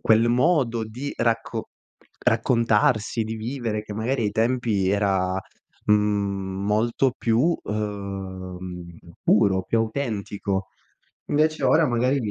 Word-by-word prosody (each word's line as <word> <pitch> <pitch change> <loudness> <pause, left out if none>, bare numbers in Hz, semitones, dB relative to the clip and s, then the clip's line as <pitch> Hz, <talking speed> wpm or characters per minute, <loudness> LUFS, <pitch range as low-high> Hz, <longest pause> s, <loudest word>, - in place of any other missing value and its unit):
quel 115 +1 +4
modo 125 -3 +2
di 125 +6 -6
racco 115 -1 -1 0.5
raccontarsi, 115 -1 +2
di 110 +1 -4
vivere, 115 -2 -3
che 105 -1 -8
magari 115 +2 -1
ai 105 - +1
tempi 115 -4 +1
era, 95 -2 +1 0.5
mhmm, 100 -2 +1
molto 115 +5 +1
più, 125 +9 +2
uhm, 95 -4 -5 0.3
puro, 100 -3 +4
più 115 - 0
autentico. 105 -5 -2 0.6
Invece 155 +1 +1
ora 160 0 +5
magari 125 +3 +2
110 Hz, 105 wpm, -24 LUFS, 100-120 Hz, 0.6 s, ora